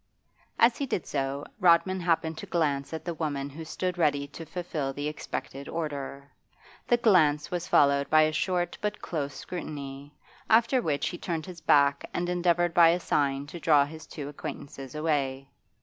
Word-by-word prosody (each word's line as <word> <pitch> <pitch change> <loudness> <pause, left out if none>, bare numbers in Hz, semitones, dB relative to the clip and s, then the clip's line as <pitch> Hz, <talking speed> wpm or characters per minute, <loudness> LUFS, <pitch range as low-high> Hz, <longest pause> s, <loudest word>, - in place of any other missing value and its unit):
As 230 +1 +5
he 280 - -1
did 185 - -2
so 140 0 -2
Rodman 180 +2 +4
happened 165 -2 0
to - - -7
glance 145 -5 0
at 160 - -6
the 170 - -2
woman 145 -3 -3
who 160 +4 -8
stood 180 +2 -3
ready 145 -3 +2
to 165 +3 -9
fulfil 160 -6 -3
the 145 +2 -3
expected 140 -2 -6
order. 140 -3 -5 0.6
The 240 - +4
glance 160 -10 +3
was 175 0 -3
followed 140 -5 +4
by 155 0 +6
a 155 - +2
short 175 +2 -1
but 210 0 -2
close 145 -4 -4
scrutiny, 145 -3 -7 0.3
after 235 +3 +4
which 145 - 0
he 175 - -7
turned 165 -3 -3
his 180 -2 -10
back 140 -2 +4
and 175 0 -1
endeavoured 175 -1 +2
by 170 -1 +7
a 175 +2 +2
sign 140 -4 0
to 170 +4 -8
draw 150 -3 +4
his 155 +2 -10
two 145 -3 -7
acquaintances 140 -2 -8
away. 140 -4 -1
155 Hz, 175 wpm, -28 LUFS, 140-175 Hz, 0.6 s, by